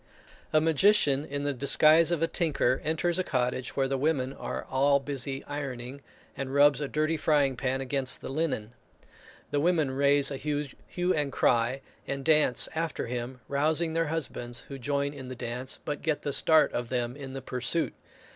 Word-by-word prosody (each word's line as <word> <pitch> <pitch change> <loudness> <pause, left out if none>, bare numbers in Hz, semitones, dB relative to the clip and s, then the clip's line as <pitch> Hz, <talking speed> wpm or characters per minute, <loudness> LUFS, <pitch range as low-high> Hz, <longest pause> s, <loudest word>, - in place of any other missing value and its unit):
A 155 - +5
magician, 160 -3 +3
in 140 -1 -4
the 145 0 0
disguise 155 +5 +5
of 170 -2 0
a - - +3
tinker, 150 -8 0
enters 165 +3 0
a - - +2
cottage 125 -3 -2
where 135 -1 +1
the 135 0 -1
women 135 -3 0
are - - -5
all 140 +1 +3
busy 135 -1 -3
ironing, 135 -2 -6 0.3
and 135 0 -4
rubs 145 0 +5
a 145 - -1
dirty 155 +3 0
frying 145 -3 +2
pan 130 +1 -1
against 135 0 -1
the - - -7
linen. 135 -7 -2 0.8
The 145 - +1
women 160 -3 +2
raise 140 +1 +3
a 140 - -3
hue 150 +5 -2
and 145 -2 -1
cry, 120 +2 +1 0.3
and 135 0 -4
dance 155 -5 +3
after 165 0 -2
him, 125 +1 -5
rousing 155 +3 +1
their 165 0 +1
husbands, 125 -6 -4
who 135 -1 -9
join 140 +2 -1
in 135 -3 -9
the 130 - -6
dance, 125 +2 -4
but 145 -1 -3
get 155 -2 -1
the 145 - -2
start 160 +2 +4
of 120 -1 -3
them 125 -1 -2
in 135 -2 -8
the 135 - -5
pursuit. 125 +6 -2
140 Hz, 180 wpm, -28 LUFS, 130-155 Hz, 0.8 s, A